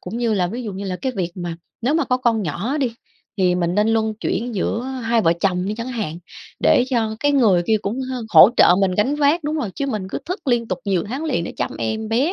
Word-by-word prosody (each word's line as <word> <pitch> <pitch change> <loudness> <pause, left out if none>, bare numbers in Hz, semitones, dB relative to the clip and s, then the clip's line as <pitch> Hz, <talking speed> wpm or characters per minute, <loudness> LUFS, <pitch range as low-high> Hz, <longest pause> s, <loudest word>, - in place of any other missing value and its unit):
Cũng 205 +6 -6
như 230 -3 +1
là 180 -3 +1
ví 240 +7 -5
dụ 210 -4 -5
như 195 +2 -6
là 185 -1 -3
cái 260 +4 -3
việc 180 -3 -1
mà 175 -2 -5 0.2
nếu 255 +6 +1
mà 330 - +2
có 250 - +1
con 235 -4 +1
nhỏ 200 - -2
đi, 250 -5 -1 0.4
thì 180 -2 +2
mình 175 0 0
nên 210 +1 +2
luân 220 -1 +1
chuyển 225 +2 -3
giữa 215 +4 -1
hai 245 -3 -1
vợ 165 -6 +3
chồng 180 -1 0
đi 210 - -2
chẳng 230 +2 -5
hạn 215 -10 -4 0.4
để 250 - +4
cho 225 -3 0
cái 290 0 +2
người 210 -11 +4
kia 220 - +3
cũng 225 +7 -3
hơ 255 -2 -4
hỗ 190 +1 +8
trợ 175 - +7
mình 190 -2 +2
gánh 250 +9 +1
vác 295 +3 +2
đúng 305 +1 -1
rồi, 250 -10 -2
chứ 280 - -2
mình 210 -7 -3
cứ - - -4
thức 365 -1 -5
liên 235 -2 +1
tục 185 - -2
nhiều 190 -4 0
tháng 270 +8 -4
liền 315 - -1
để - - -6
chăm - - -2
em 220 0 -3
bé 260 +10 +1
225 Hz, 270 wpm, -21 LUFS, 190-255 Hz, 0.4 s, hỗ